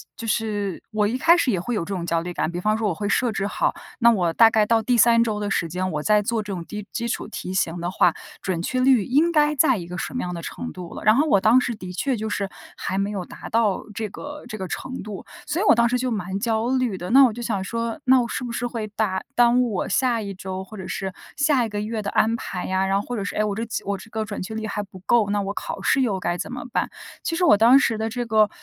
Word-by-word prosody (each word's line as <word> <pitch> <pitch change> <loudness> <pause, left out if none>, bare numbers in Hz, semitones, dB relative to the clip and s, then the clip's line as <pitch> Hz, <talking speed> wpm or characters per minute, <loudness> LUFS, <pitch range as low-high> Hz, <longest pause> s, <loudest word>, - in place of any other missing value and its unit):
就 230 - -7
是 210 -4 -1
我 215 -1 +1
一 225 +5 0
开 335 +6 +6
始 315 -7 +2
也 190 - 0
会 230 +7 -3
有 200 - -1
这 200 - -5
种 180 -3 -3
焦 165 -1 0
虑 175 +1 -5
感。 170 - -1
比 175 +1 -4
方 215 +3 +1
说 220 -1 0
我 195 - 0
会 205 +4 -3
设 235 +2 +1
置 195 -1 -1
好， 205 - 0 0.2
那 235 -1 +6
我 180 -7 +1
大 225 +6 +6
概 220 -1 +3
到 225 +1 +3
第 245 +3 +1
3 230 0 +5
周 215 -3 0
的 205 -1 -2
时 170 - 0
间 185 +3 -2
我 150 -2 -2
在 210 +5 +3
做 225 +2 -1
这 205 -1 -5
种 175 -2 -5
低 210 +1 -7
基 235 0 -2
础 - - -3
题 185 -3 -6
型 175 -2 -1
的 175 +1 -2
话， 180 -2 +3 0.3
准 180 -3 -2
确 255 +8 -1
率 255 -4 +4
应 290 - +3
该 300 -1 +4
在 270 -2 +4
一 180 -5 -5
个 180 +1 -6
什 - - -4
么 250 - -2
样 180 - -3
的 170 - -5
程 245 - -6
度 180 -2 -9
了？ - - -7
然 215 - +6
后 300 +3 +3
我 200 -9 +4
当 225 +5 +6
时 245 -2 -2
的 185 -4 -8
确 265 +8 0
就 220 -1 -3
是 200 -2 -2 0.3
还 190 - -3
没 195 +1 0
有 195 -4 -4
达 - - -10
到 220 -4 +1
这 220 -1 -2
个 290 +8 -8
这 215 - -6
个 190 -2 -5
程 260 +8 -5
度， 205 -1 -7 0.2
所 335 - -1
以 - - +1
我 - - +8
当 235 +1 +3
时 250 - +1
就 250 0 -1
蛮 190 -3 -3
焦 225 +1 0
虑 255 -6 0
的。 180 0 -6
那 270 +4 +8
我 240 - +1
就 240 - -7
想 210 -5 -2
说， 230 +4 -3
那 260 0 +6
我 235 - -2
是 - - -3
不 245 - -4
是 240 +1 -2
会 230 -3 -4
耽 190 -4 0
耽 240 0 +5
误 240 -3 0
我 185 - -2
下 245 +1 +1
一 200 -2 -5
周 190 0 -6
或 215 +3 -11
者 190 - -7
是 190 -1 -4 0.2
下 285 -4 +3
一 - - -5
个 205 -1 -3
月 215 +1 -3
的 200 - -3
安 225 +1 +2
排 185 -5 -5
呀？ 190 0 0
然 195 +1 +1
后 205 - -5
或 245 - -3
者 205 - -2
是， 200 - -4
诶， 215 - +2
我 210 -1 -1
这 225 - -2 0.2
我 200 0 -1
这 205 +4 -13
个 220 0 -2
准 205 -1 -5
确 205 - -6
率 220 0 -3
还 210 0 -3
不 190 -2 -13
够， 230 -4 +3
那 205 0 +1
我 200 0 -3
考 220 - -5
试 265 - +2
又 210 -7 0
该 175 -1 -1
怎 - - -5
么 250 - -5
办？ - - 0 0.3
其 330 - -1
实 360 - 0
我 335 - +6
当 235 +5 +7
时 230 -5 +1
的 220 +1 -2
这 245 +2 -3
个 215 -2 +3
215 Hz, 320 characters per minute, -23 LUFS, 195-240 Hz, 0.3 s, 我